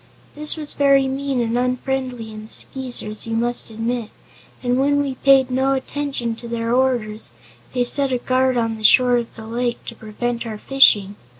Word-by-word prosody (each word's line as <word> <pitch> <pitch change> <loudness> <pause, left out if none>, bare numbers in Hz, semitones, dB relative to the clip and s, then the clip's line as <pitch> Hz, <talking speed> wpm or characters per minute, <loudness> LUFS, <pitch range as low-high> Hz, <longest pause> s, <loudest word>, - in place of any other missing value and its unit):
That 300 +2 0
was 300 -2 -3
very 275 -1 +3
mean 270 -1 -2
and 230 0 -1
unfriendly 250 -2 -2
in 215 0 -9
the - - -15
Skeezers, 245 -5 -1
you 225 - -2
must 240 +1 -1
admit, 225 0 -3 0.5
and 250 +1 +1
when 285 +1 +2
we 280 -2 -1
paid 265 -1 +4
no 265 +1 +1
attention 270 -3 -3
to 235 - -9
their 230 0 -2
orders 240 -4 0 0.4
they 250 - +2
set 275 +2 +2
a 250 - +1
guard 255 +1 +1
on 225 -1 -1
the - - -10
shore 245 +3 +5
of 235 -1 -5
the 220 - -10
lake 240 +1 -3
to 230 - -7
prevent 235 +2 -4
our 215 -1 -5
fishing. 210 -6 +4
245 Hz, 185 wpm, -20 LUFS, 230-265 Hz, 0.5 s, shore